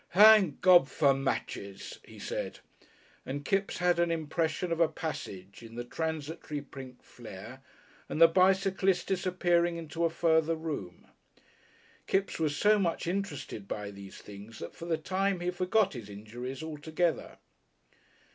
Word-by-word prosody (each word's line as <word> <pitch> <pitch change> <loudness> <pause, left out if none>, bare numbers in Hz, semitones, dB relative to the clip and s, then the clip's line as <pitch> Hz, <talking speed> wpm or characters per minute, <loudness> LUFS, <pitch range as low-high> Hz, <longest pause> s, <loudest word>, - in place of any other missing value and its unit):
"Thank 210 -6 +7
God 175 -6 +7
for 140 +1 +3
matches!" 135 -7 -4
he - - -14
said, - - -4 0.7
and 145 +2 -5
Kipps 195 0 0
had 180 -1 +2
an 170 0 +3
impression 165 +1 -1
of 165 - 0
a 165 - +5
passage 100 - -6
in 115 0 -11
the 120 - -4
transitory 160 +2 -4
pink 130 -2 -11
flare 115 +2 -11 0.5
and - - -3
the 165 - +10
bicyclist 190 +1 +3
disappearing 175 -2 +1
into 165 +1 -4
a 165 - +3
further 165 -1 +2
room. 150 - -6 1.0
Kipps 195 -2 0
was 150 -3 0
so 210 0 +4
much 170 -4 0
interested 150 - -4
by 105 0 -4
these 100 -1 -11
things 105 +2 -11
that - - -7
for 170 - -9
the 165 -2 0
time 190 +3 0
he 175 +1 -1
forgot 185 +2 +1
his 115 -6 -8
injuries 120 +8 -7
altogether. 160 +2 -2
160 Hz, 145 wpm, -30 LUFS, 130-180 Hz, 1.0 s, the